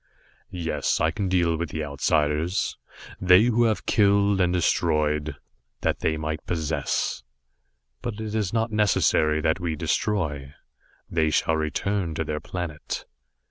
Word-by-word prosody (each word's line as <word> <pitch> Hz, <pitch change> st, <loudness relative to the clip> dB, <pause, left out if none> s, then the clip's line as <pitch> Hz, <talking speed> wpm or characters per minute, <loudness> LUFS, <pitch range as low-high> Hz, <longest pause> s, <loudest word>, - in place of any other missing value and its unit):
"Yes, 80 Hz, -5 st, -1 dB
I 80 Hz, -, +2 dB
can 95 Hz, +3 st, -2 dB
deal 85 Hz, -3 st, +2 dB
with 85 Hz, -1 st, -3 dB
the 80 Hz, +1 st, -3 dB
Outsiders 75 Hz, +5 st, 0 dB, 0.4 s
they 90 Hz, +2 st, +6 dB
who 120 Hz, 0 st, +3 dB
have 110 Hz, -4 st, 0 dB
killed 100 Hz, -1 st, +3 dB
and 90 Hz, -1 st, +2 dB
destroyed, 75 Hz, -4 st, +1 dB, 0.5 s
that -, -, 0 dB
they 80 Hz, -, 0 dB
might 80 Hz, 0 st, -4 dB
possess. 80 Hz, -6 st, -1 dB, 0.8 s
But 120 Hz, -3 st, -4 dB
it 110 Hz, -1 st, -4 dB
is 105 Hz, -4 st, 0 dB
not 115 Hz, 0 st, 0 dB
necessary 80 Hz, -7 st, +2 dB
that 80 Hz, +3 st, +1 dB
we 85 Hz, -3 st, -2 dB
destroy. 75 Hz, -6 st, -1 dB, 0.5 s
They 80 Hz, -2 st, +1 dB
shall 80 Hz, +1 st, +1 dB
return 80 Hz, +3 st, -1 dB
to 80 Hz, -, -1 dB
their 75 Hz, -1 st, -3 dB
planet." 85 Hz, -4 st, -5 dB
85 Hz, 140 wpm, -25 LUFS, 75-100 Hz, 0.8 s, they